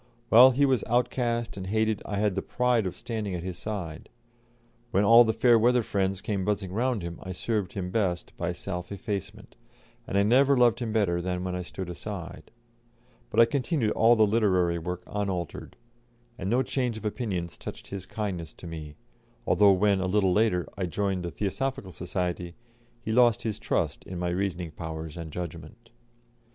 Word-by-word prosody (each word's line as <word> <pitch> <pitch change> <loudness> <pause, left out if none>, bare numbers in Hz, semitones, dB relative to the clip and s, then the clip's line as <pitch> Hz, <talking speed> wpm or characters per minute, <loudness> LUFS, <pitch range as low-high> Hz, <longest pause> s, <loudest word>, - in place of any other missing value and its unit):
While 125 +4 +9
he 135 +2 +3
was 130 -5 +2
outcast 120 -1 0
and 95 -1 -5
hated 110 +1 +1
I 100 - -3
had 105 -1 +1
the 95 - -2
pride 125 -3 +1
of 90 - -5
standing 110 -5 -4
at 85 - -5
his 90 -1 -5
side; 90 -8 -5 0.8
when 100 -2 +2
all 115 +3 +8
the 110 - +1
fair 120 0 +4
weather 120 +1 +3
friends 95 -1 -1
came 100 -3 -1
buzzing 100 -2 -1
round 120 -2 0
him 85 -1 -6
I 95 - -6
served 105 0 -2
him 90 -2 -4
best 95 -5 -1
by 85 +1 -2
self 90 0 -5
effacement, 100 -1 -5 0.5
and 100 - -1
I 100 - +4
never 135 +6 +4
loved 120 -1 +4
him 120 -3 -3
better 95 -6 +1
than 90 0 -2
when 90 -1 -3
I 90 - -3
stood 90 +1 -6
aside. 85 -1 -7 0.8
But - - +4
I - - +8
continued 125 -1 0
all 115 +2 +5
the 110 -1 +5
literary 95 -6 +2
work 90 +2 -5
unaltered, 95 -5 -4 0.6
and 95 -5 -4
no 125 +4 +3
change 125 -5 -1
of 110 - -9
opinions 100 - -3
touched - - -8
his 95 -2 -6
kindness 95 -7 -4
to - - -12
me, 80 -3 -7 0.5
although 100 +3 +5
when, 100 +1 +3
a 95 - -1
little 95 -1 +2
later, 105 -4 +2
I 95 -2 -2
joined 95 +1 -1
the 85 - -3
Theosophical 105 - -3
Society, 90 0 -3 0.5
he 110 - -3
lost 120 -1 +4
his 110 -3 -3
trust - - -1
in 90 - -6
my 90 0 -1
reasoning 90 -2 -2
powers 80 0 -6
and 85 -2 -7
judgment. 85 +7 -8
100 Hz, 185 wpm, -27 LUFS, 90-115 Hz, 0.8 s, While